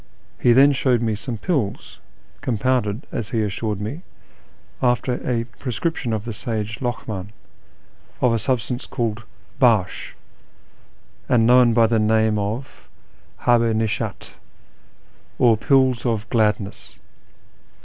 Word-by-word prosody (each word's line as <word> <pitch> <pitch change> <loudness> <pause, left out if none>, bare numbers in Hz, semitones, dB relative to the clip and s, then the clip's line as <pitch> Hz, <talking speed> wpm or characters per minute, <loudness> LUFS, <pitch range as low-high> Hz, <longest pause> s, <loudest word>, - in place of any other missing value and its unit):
He 120 - +4
then 135 +4 +7
showed 130 -3 +2
nie 110 -1 0
some 110 +3 -5
pills, 135 - -2 0.4
compounded, 120 -1 0
as 105 - -4
he 115 -2 0
assured 105 0 -3
me, 110 +11 -5 0.8
after 125 0 +1
a 120 -1 -1 0.2
ju'escription 125 +1 -2
of 110 -1 -2
the 115 - -4
sage 110 0 -4
Lokm; 120 -5 -3
in, 100 - -16 0.9
of 125 -2 +3
a 115 - +1
substance 125 +1 -2
called 115 -3 -2 0.4
harsh, 110 -8 +2 1.1
and 115 -3 +4
known 120 -1 +5
by 115 -1 +5
the 115 0 +2
name 110 0 +2
of 110 +7 -5 0.5
habh 120 -1 +4
i - - 0
nishdt, 110 -1 -2 1.1
or 120 -3 +5
" - - -17
pills 130 -3 +4
of 115 -3 -1
gladness." 105 -3 -1
115 Hz, 130 wpm, -22 LUFS, 110-125 Hz, 1.1 s, then